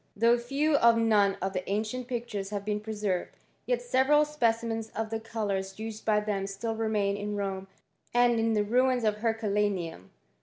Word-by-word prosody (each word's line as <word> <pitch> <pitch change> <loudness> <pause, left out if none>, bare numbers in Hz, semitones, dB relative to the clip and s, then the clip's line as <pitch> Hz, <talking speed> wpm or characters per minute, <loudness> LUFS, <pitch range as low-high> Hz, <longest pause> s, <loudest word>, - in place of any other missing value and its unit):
^ - - -41
Though 235 +3 +4
few 285 +5 +1
or 235 -3 +6
none 215 -4 +3
of 190 0 -1
the 185 0 -4
ancient 220 +5 -2
pictures 230 -5 -4
hMi 205 -1 -4
been 210 0 -1
preserved, 210 -4 -3 0.3
yet - - 0
several 295 - +4
specimens 230 -6 -1
of 220 0 -3
the 225 - -1
co' 220 -2 -3 0.2
used 220 0 -7
by 215 -1 +3
them 205 -2 -2
still 200 +4 -3
remain 215 -3 0
in 205 0 -4
Rome 195 -1 -3 0.4
and 240 -1 +3
in 225 0 +2
the 210 -1 +2
ru 245 +5 +3
Herculaneum. 210 - -1
220 Hz, 175 wpm, -29 LUFS, 205-235 Hz, 0.4 s, or